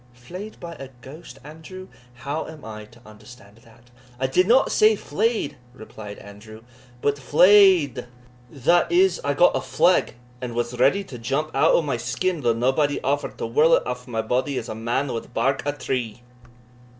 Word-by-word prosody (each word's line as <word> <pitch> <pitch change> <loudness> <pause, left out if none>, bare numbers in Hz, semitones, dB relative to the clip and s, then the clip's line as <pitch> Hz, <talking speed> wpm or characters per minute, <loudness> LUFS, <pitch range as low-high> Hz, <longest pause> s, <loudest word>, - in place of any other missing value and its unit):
"Flay'd 180 - -10
by 170 -1 -8
a 135 - -7
ghost, 135 +1 -12
Andrew! 160 +5 -11 0.3
how 140 +5 -5
am 160 -5 -11
I 110 -1 -8
to 115 +2 -20
understand 110 -1 -16
that?" 115 +1 -22 0.3
"I 130 - 0
did 180 +8 +2
not 250 +4 +4
say 215 0 +4
flay'd," 220 - -2 0.2
replied 110 -3 -10
Andrew, 110 +2 -13 0.4
"but 145 0 0
fley'd, 170 - +4 0.4
that 145 +8 +1
is, 380 +6 +3
I - - -1
got - - +4
a - - +1
fleg, 180 - +1 0.3
and 120 -2 -5
was 120 +1 -3
ready 140 +11 +3
to 130 -10 -10
jump 135 +7 -3
out - - +4
o' 170 - +2
my 140 -5 -2
skin, 145 +9 -2
though 120 -3 +1
naebody 135 +5 +1
offered 145 +2 -2
to - - -4
whirl 150 +8 +4
it - - -1
aff 125 +1 -5
my 115 -2 -3
body 130 +4 -1
as 120 - -5
a - - -4
man 120 +5 -2
wad 115 +1 -7
bark 135 0 0
a - - +2
tree." 125 -5 -4
135 Hz, 180 wpm, -23 LUFS, 120-165 Hz, 0.4 s, not